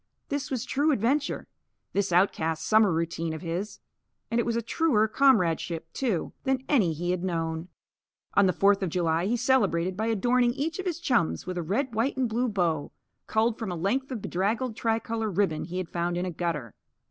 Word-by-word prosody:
This 285 Hz, -1 st, -2 dB
was 255 Hz, -2 st, -2 dB
true 290 Hz, +5 st, +2 dB
adventure, 275 Hz, +4 st, 0 dB, 0.5 s
this 200 Hz, -2 st, 0 dB
outcast 165 Hz, -3 st, +1 dB
summer 215 Hz, -3 st, +5 dB
routine 165 Hz, 0 st, -1 dB
of 160 Hz, -, -7 dB
his. 180 Hz, +5 st, -4 dB, 0.5 s
And 230 Hz, -, +2 dB
it 235 Hz, -, 0 dB
was 235 Hz, -, 0 dB
a 235 Hz, -, -1 dB
truer 230 Hz, -4 st, +2 dB
comradeship, 180 Hz, -10 st, +2 dB
too, 225 Hz, -11 st, -1 dB
than 265 Hz, -1 st, 0 dB
any 215 Hz, -, +3 dB
he 175 Hz, +3 st, -2 dB
had 180 Hz, -1 st, -2 dB
known. 165 Hz, -2 st, -2 dB, 0.7 s
On 200 Hz, -1 st, +5 dB
the -, -, +4 dB
Fourth 195 Hz, +3 st, +3 dB
of 190 Hz, -, 0 dB
July 170 Hz, +1 st, +1 dB
he 240 Hz, +3 st, +1 dB
celebrated 200 Hz, -8 st, +2 dB
by 220 Hz, +3 st, -1 dB
adorning 240 Hz, +2 st, +2 dB
each 315 Hz, +5 st, -2 dB
of 380 Hz, -, -3 dB
his 345 Hz, -2 st, -2 dB
chums 245 Hz, -, +1 dB
with 180 Hz, 0 st, -3 dB
a -, -, -1 dB
red 230 Hz, -, -1 dB
white 235 Hz, +5 st, 0 dB
and 260 Hz, -2 st, +1 dB
blue 240 Hz, +3 st, 0 dB
bow, 170 Hz, -7 st, 0 dB, 0.4 s
culled 225 Hz, +1 st, +1 dB
from 220 Hz, -5 st, -3 dB
a -, -, -3 dB
length 220 Hz, +11 st, -1 dB
of 245 Hz, -6 st, -5 dB
bedraggled 220 Hz, +6 st, -1 dB
tricolour 225 Hz, -1 st, -1 dB
ribbon 185 Hz, -5 st, 0 dB
he 180 Hz, +1 st, -5 dB
had 185 Hz, -2 st, -2 dB
found 175 Hz, 0 st, -1 dB
in 180 Hz, -, -1 dB
a 180 Hz, -, -3 dB
gutter. 155 Hz, -, -3 dB
205 Hz, 195 wpm, -27 LUFS, 175-245 Hz, 0.7 s, summer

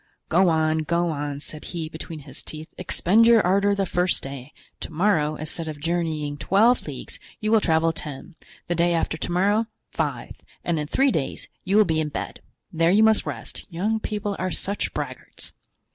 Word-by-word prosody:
"Go 180 Hz, +2 st, +5 dB
on, 160 Hz, -1 st, +2 dB
go 170 Hz, +2 st, +1 dB
on," 145 Hz, -1 st, -3 dB
said 155 Hz, 0 st, -7 dB
he, 165 Hz, -3 st, -4 dB
between 160 Hz, 0 st, -8 dB
his 135 Hz, -2 st, -10 dB
teeth, 155 Hz, 0 st, -8 dB
"expend 225 Hz, +6 st, +3 dB
your 235 Hz, -1 st, +7 dB
ardor 200 Hz, +2 st, +3 dB
the 195 Hz, -1 st, 0 dB
first 180 Hz, 0 st, +1 dB
day; 135 Hz, 0 st, -7 dB, 0.3 s
to -, -, -6 dB
morrow, 155 Hz, -3 st, +2 dB
instead 155 Hz, +2 st, -4 dB
of 155 Hz, -2 st, -5 dB
journeying 160 Hz, -3 st, -1 dB
twenty 225 Hz, +6 st, +4 dB
leagues, -, -, -7 dB, 0.2 s
you 215 Hz, -2 st, -1 dB
will 220 Hz, -1 st, +5 dB
travel 165 Hz, -1 st, +2 dB
ten, 150 Hz, +2 st, -7 dB, 0.3 s
the 175 Hz, -, +1 dB
day 170 Hz, 0 st, +2 dB
after 165 Hz, -, 0 dB
to 160 Hz, -, -4 dB
morrow, 205 Hz, +5 st, +2 dB, 0.2 s
five, -, -, -2 dB, 0.3 s
and 170 Hz, -2 st, 0 dB
in 150 Hz, -, -3 dB
three 270 Hz, -, +3 dB
days 135 Hz, -, -3 dB, 0.2 s
you 195 Hz, +3 st, +2 dB
will 215 Hz, -, +7 dB
be 160 Hz, -3 st, +1 dB
in 150 Hz, -, -2 dB
bed. 145 Hz, -, -5 dB, 0.3 s
There 165 Hz, +1 st, +3 dB
you 205 Hz, +4 st, +5 dB
must 220 Hz, -1 st, +4 dB
rest; -, -, -6 dB
young 205 Hz, +6 st, 0 dB
people 205 Hz, -2 st, -3 dB
are 185 Hz, -, 0 dB
such 200 Hz, +3 st, -2 dB
braggarts." -, -, -6 dB
170 Hz, 190 wpm, -24 LUFS, 155-200 Hz, 0.3 s, your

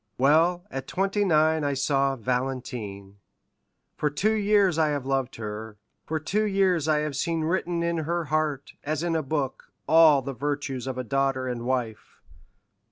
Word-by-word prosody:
Well, 165 Hz, +7 st, +3 dB
at 135 Hz, 0 st, -5 dB
twenty 195 Hz, +2 st, 0 dB
nine 160 Hz, -3 st, +3 dB
I 140 Hz, -1 st, 0 dB
saw 135 Hz, 0 st, +1 dB
Valentine; 120 Hz, -5 st, -4 dB, 0.8 s
for 150 Hz, -, 0 dB
two 185 Hz, +10 st, +1 dB
years 205 Hz, -5 st, +3 dB
I 155 Hz, -, +4 dB
have 145 Hz, -3 st, -2 dB
loved 135 Hz, -1 st, -1 dB
her, 110 Hz, 0 st, -6 dB, 0.3 s
for 160 Hz, 0 st, -1 dB
two 210 Hz, +8 st, 0 dB
years 190 Hz, -6 st, +2 dB
I 150 Hz, -1 st, +2 dB
have 150 Hz, -2 st, -3 dB
seen 165 Hz, +3 st, -1 dB
written 170 Hz, +1 st, -1 dB
in 170 Hz, 0 st, 0 dB
her 170 Hz, +2 st, -1 dB
heart, 155 Hz, -2 st, -1 dB
as 155 Hz, +2 st, -2 dB
in 170 Hz, -1 st, 0 dB
a 160 Hz, -, +1 dB
book, 140 Hz, -2 st, -3 dB, 0.2 s
all 155 Hz, -4 st, +6 dB
the 140 Hz, +1 st, -4 dB
virtues 140 Hz, -1 st, -3 dB
of 130 Hz, -1 st, -4 dB
a 130 Hz, -, -2 dB
daughter 135 Hz, 0 st, 0 dB
and 120 Hz, -1 st, -4 dB
wife. 120 Hz, -4 st, -3 dB
145 Hz, 165 wpm, -26 LUFS, 130-165 Hz, 0.8 s, all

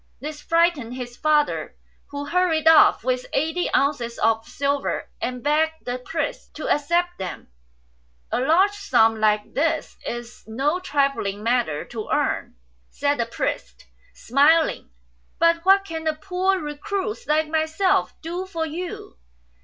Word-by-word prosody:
This 300 Hz, +1 st, -7 dB
frightened 330 Hz, -8 st, +1 dB
his 245 Hz, -1 st, -7 dB
father, 300 Hz, +1 st, +1 dB, 0.3 s
who 285 Hz, 0 st, -6 dB
hurried 325 Hz, 0 st, +1 dB
off 320 Hz, -7 st, +6 dB
with 250 Hz, 0 st, -1 dB
eighty 320 Hz, +5 st, 0 dB
ounces 250 Hz, -5 st, 0 dB
of 225 Hz, 0 st, +1 dB
silver, 280 Hz, 0 st, -2 dB
and 250 Hz, -1 st, -3 dB
begged 315 Hz, +2 st, +1 dB
the 245 Hz, 0 st, -3 dB
priest 315 Hz, +2 st, -4 dB
to 310 Hz, -, -5 dB
accept 345 Hz, +4 st, +1 dB
them. 185 Hz, -2 st, -6 dB, 0.4 s
" -, -, -39 dB
A -, -, +1 dB
large 335 Hz, +10 st, +4 dB
sum 225 Hz, -, +2 dB
like 210 Hz, -1 st, +1 dB
this 320 Hz, +2 st, -1 dB
is 240 Hz, 0 st, -6 dB
no 275 Hz, +10 st, 0 dB
trifling 275 Hz, -, -1 dB
matter 230 Hz, -11 st, 0 dB
to 225 Hz, -3 st, -7 dB
earn," -, -, -1 dB, 0.3 s
said 285 Hz, -1 st, -1 dB
the 235 Hz, -, 0 dB
priest, 230 Hz, -, -4 dB, 0.3 s
smiling; 295 Hz, +6 st, +3 dB, 0.2 s
' 60 Hz, 0 st, -40 dB
' -, -, -39 dB
but 335 Hz, 0 st, +3 dB
what 390 Hz, +1 st, +5 dB
can 320 Hz, -3 st, -5 dB
a 310 Hz, -, +1 dB
poor 370 Hz, +4 st, 0 dB
recluse 400 Hz, +9 st, -4 dB
like 310 Hz, +1 st, +2 dB
myself 320 Hz, +4 st, +1 dB
do 350 Hz, +3 st, -4 dB
for 330 Hz, -4 st, -3 dB
you?" 330 Hz, -, -7 dB
295 Hz, 145 wpm, -23 LUFS, 245-330 Hz, 0.4 s, off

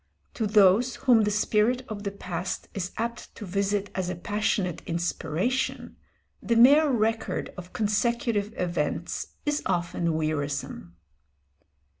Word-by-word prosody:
To 220 Hz, -, -1 dB
those 210 Hz, +4 st, +4 dB
whom 235 Hz, -5 st, +4 dB
the -, -, +1 dB
spirit 215 Hz, +4 st, +1 dB
of 215 Hz, -3 st, -6 dB
the 200 Hz, -, -2 dB
past 180 Hz, -2 st, -5 dB
is 190 Hz, -1 st, -3 dB
apt 235 Hz, +1 st, -4 dB
to 210 Hz, -, -7 dB
visit 200 Hz, +2 st, -1 dB
as 185 Hz, -1 st, -2 dB
a 180 Hz, -, -3 dB
passionate 195 Hz, -1 st, -1 dB
inspiration, 170 Hz, +8 st, -2 dB, 0.5 s
the 235 Hz, -, 0 dB
mere 285 Hz, +6 st, +7 dB
record 225 Hz, -2 st, -1 dB
of 180 Hz, -1 st, -9 dB
consecutive 220 Hz, 0 st, 0 dB
events 170 Hz, -4 st, -2 dB, 0.2 s
is 295 Hz, 0 st, 0 dB
often 170 Hz, -1 st, 0 dB
wearisome. 145 Hz, -, -3 dB
205 Hz, 125 wpm, -27 LUFS, 175-230 Hz, 0.5 s, mere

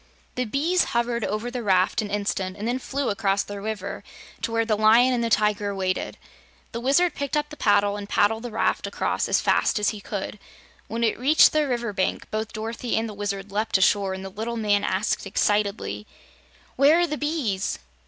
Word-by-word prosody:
The 250 Hz, -, -2 dB
bees 315 Hz, +10 st, +1 dB
hovered 235 Hz, -1 st, 0 dB
over 215 Hz, +5 st, -2 dB
the 245 Hz, 0 st, -4 dB
raft 190 Hz, 0 st, +2 dB
an 210 Hz, -, -5 dB
instant 200 Hz, -2 st, -2 dB
and 210 Hz, +2 st, -4 dB
then 245 Hz, +2 st, 0 dB
flew 275 Hz, +1 st, -2 dB
across 200 Hz, -1 st, +1 dB
the 205 Hz, -1 st, -7 dB
river 210 Hz, -2 st, -5 dB, 0.4 s
to -, -, -2 dB
where 230 Hz, 0 st, +1 dB
the 220 Hz, -1 st, +1 dB
Lion 225 Hz, +4 st, +5 dB
and 240 Hz, -1 st, 0 dB
the 230 Hz, -, 0 dB
Tiger 210 Hz, -2 st, +1 dB
waited. 185 Hz, -1 st, -2 dB, 0.5 s
The 230 Hz, -, -4 dB
Wizard 290 Hz, +7 st, +3 dB
picked 280 Hz, +1 st, -2 dB
up 295 Hz, 0 st, -1 dB
the -, -, -7 dB
paddle 205 Hz, -4 st, +2 dB
and 205 Hz, 0 st, -7 dB
paddled 220 Hz, +2 st, +2 dB
the 245 Hz, -, -5 dB
raft 225 Hz, 0 st, 0 dB
across -, -, -1 dB
as -, -, +3 dB
fast -, -, +2 dB
as 205 Hz, -1 st, +2 dB
he 210 Hz, -2 st, -6 dB
could. 200 Hz, 0 st, -5 dB, 0.5 s
When 230 Hz, +2 st, -3 dB
it 225 Hz, -, +1 dB
reached 290 Hz, +5 st, +6 dB
the 305 Hz, -1 st, +2 dB
river 240 Hz, -4 st, -2 dB
bank, 185 Hz, -1 st, -1 dB
both 215 Hz, 0 st, -3 dB
Dorothy 230 Hz, +2 st, -3 dB
and 225 Hz, +1 st, 0 dB
the 215 Hz, -, -7 dB
Wizard 200 Hz, -1 st, -4 dB
leaped 215 Hz, +1 st, +1 dB
ashore 195 Hz, 0 st, +2 dB
and 190 Hz, 0 st, -7 dB
the -, -, -5 dB
little 225 Hz, +4 st, -4 dB
man 205 Hz, -2 st, +1 dB
asked 195 Hz, +1 st, -1 dB
excitedly: 200 Hz, -, -1 dB, 0.7 s
"Where 295 Hz, +6 st, +5 dB
are -, -, +4 dB
the 305 Hz, -3 st, -3 dB
bees?" 285 Hz, -, -1 dB
215 Hz, 205 wpm, -24 LUFS, 200-245 Hz, 0.7 s, reached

